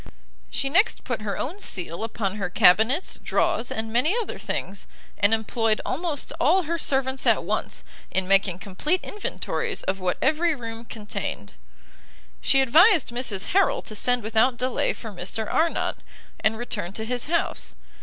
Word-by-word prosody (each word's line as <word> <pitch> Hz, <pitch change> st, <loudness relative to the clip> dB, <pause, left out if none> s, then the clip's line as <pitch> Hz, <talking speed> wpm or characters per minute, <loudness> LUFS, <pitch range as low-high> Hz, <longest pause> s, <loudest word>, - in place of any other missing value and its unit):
She 275 Hz, -, -1 dB
next 370 Hz, +11 st, +3 dB
put 240 Hz, -4 st, -3 dB
her 205 Hz, -2 st, -3 dB
own 345 Hz, +10 st, -4 dB
seal 180 Hz, -, -2 dB
upon 215 Hz, -3 st, -3 dB
her 190 Hz, -3 st, -2 dB
cabinets, 220 Hz, -, +4 dB
draws, 235 Hz, -, 0 dB
and 220 Hz, 0 st, -4 dB
many 295 Hz, -, +3 dB
other 460 Hz, -, -4 dB
things, 195 Hz, 0 st, -4 dB, 0.3 s
and 205 Hz, +1 st, +4 dB
employed 225 Hz, 0 st, +1 dB
almost 300 Hz, 0 st, -2 dB
all 355 Hz, +8 st, +4 dB
her 335 Hz, +1 st, -2 dB
servants 265 Hz, -2 st, 0 dB
at -, -, +4 dB
once, -, -, -3 dB, 0.3 s
in 190 Hz, -1 st, -1 dB
making 195 Hz, -2 st, +3 dB
complete 200 Hz, -, -1 dB
inventories 415 Hz, -, -3 dB
of 190 Hz, +1 st, -2 dB
what 180 Hz, -1 st, -1 dB
every 320 Hz, +1 st, +2 dB
room 230 Hz, -2 st, -7 dB
contained. 205 Hz, -, -5 dB, 0.9 s
She 270 Hz, -, +4 dB
advised 320 Hz, -, +5 dB
Mrs 235 Hz, -, -2 dB
Harrel 450 Hz, +6 st, +3 dB
to 215 Hz, -, -7 dB
send 245 Hz, +2 st, +2 dB
without 225 Hz, +3 st, +2 dB
delay 255 Hz, 0 st, 0 dB
for 225 Hz, -, -8 dB
Mr 195 Hz, +4 st, -4 dB
Arnott, 330 Hz, +1 st, 0 dB, 0.4 s
and 220 Hz, +1 st, +1 dB
return 205 Hz, -6 st, -4 dB
to 220 Hz, +1 st, -4 dB
his 245 Hz, +1 st, -2 dB
house. 340 Hz, +2 st, -1 dB
230 Hz, 155 wpm, -25 LUFS, 205-295 Hz, 0.9 s, advised